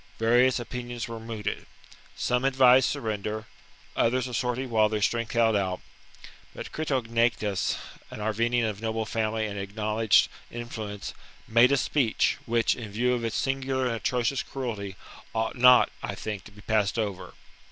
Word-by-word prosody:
Various 120 +3 +4
opinions 120 0 -5
were 115 -1 -6
mooted. 110 -2 -5 0.5
Some 125 +1 0
advised 130 -1 +5
surrender; 110 0 -3 0.5
others 125 +2 +1
a 125 - -8
sortie 125 +2 -1
while 110 -3 +3
their 110 0 -1
strength 115 +2 0
held 115 -2 +3
out; 95 -2 0 0.8
but - - -7
Critognatus, 115 -8 0 0.3
an - - -8
Arvernian 115 +3 +1
of 105 -1 -5
noble 110 0 -2
family 110 0 -1
and 100 -1 -4
acknowledged 105 +1 +2 0.2
influence, 110 -4 -6 0.3
made 120 +3 +5
a 140 - +4
speech, 130 -3 +1
which, 115 0 +2
in 110 -4 -8
view 125 +4 +1
of 120 -1 -2
its 115 -1 -2
singular 135 -1 -1
and 120 -2 0
atrocious 125 +3 0
cruelty, 105 -7 -5 0.4
ought 110 0 -1
not, 125 0 +6
I - - -4
think, 105 -3 -5
^ - - -27
to - - -12
be 105 0 -15
passed 105 +1 +1
over. 105 -5 -3
115 Hz, 155 wpm, -27 LUFS, 110-125 Hz, 0.8 s, not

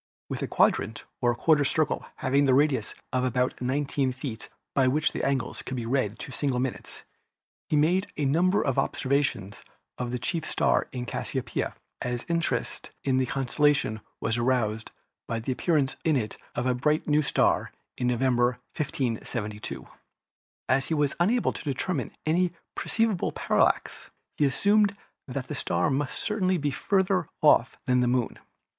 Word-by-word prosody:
With - - -4
a - - -1
quadrant - - +1 0.2
or 120 0 +3
quarter 150 +3 +4
circle 150 +2 +1
having 140 +1 +2
a 130 - +6
radius 140 -6 +2 0.2
of 130 -1 +1
about 125 0 0
19 135 +1 0
feet, 125 -3 -6 0.2
by 135 -2 +3
which 150 +4 +2
the - - -4
angles 135 -3 -1
could 130 - -5
be 120 - -3
read 115 -3 0
to 140 - -7
single 130 -2 -1
minutes, 130 -1 -4 0.7
he - - +2
made 175 +6 +3
a 145 - 0
number 175 +8 +3
of 135 -3 +1
observations 130 -7 0 0.4
of 125 -1 -2
the 125 - -2
chief 165 +6 -2
star - - +1
in 125 -1 -4
Cassiopeia, - - -3 0.3
as 120 -1 -3
interest 170 -1 -1
in 130 -2 +2
this 130 -1 +1
constellation 135 -3 +1 0.2
was 115 +1 0
aroused 115 -3 0 0.4
by 115 - -1
the 115 +4 -3
appear 160 +5 +1
ance 135 -2 +1
in 160 -2 +3
it 110 -5 -1 0.2
of - - -1
a 130 - +3
brilliant 150 +5 +1
new 150 0 +4
star 145 - +2 0.2
in 125 - -1
November, 125 0 +2 0.2
1572. 115 -7 -3 0.8
As 135 +1 +2
he 160 - 0
was 145 -2 +1
unable 220 +8 +2
to - - -7
determine 145 - -2 0.2
any 175 +2 +2 0.2
perceptible 225 -5 0
parallax, - - +1 0.3
he 150 - +2
as 135 - 0
sumed 205 0 +3 0.3
that 130 0 -4
the - - -4
star 145 +2 0
must 135 0 -1
certainly 190 -4 +1
be 145 -2 -1
farther 190 +3 +1
off 130 -5 +5
than 125 -2 +3
the 125 - +2
Moon. 125 -1 0
135 Hz, 165 wpm, -27 LUFS, 125-155 Hz, 0.8 s, a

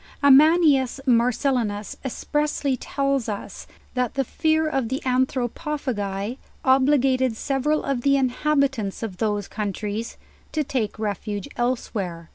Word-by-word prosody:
Amianus 285 -2 +5
Marcellinus 235 -3 +1
expressly 285 +1 -1
tells 275 -1 -1
us, 205 - -6 0.3
that 250 -2 -1
the 270 - +1
fear 315 +4 +1
of 270 -6 -1
the 260 +2 -1
Anthropophagi 255 -4 -1 0.3
obliged 260 -2 +3
several 285 +4 0
of 275 -3 -1
the 275 +2 +3
in 265 -2 +2
habitants 270 -7 0
of 200 -5 -5
those 205 -1 -1
countries 210 +1 -4 0.4
to 310 - +1
ta 255 -5 -1
ke - - -22
refuge 205 -1 -3
elsewhere. 195 -9 -2
255 Hz, 120 wpm, -24 LUFS, 220-275 Hz, 0.4 s, Amianus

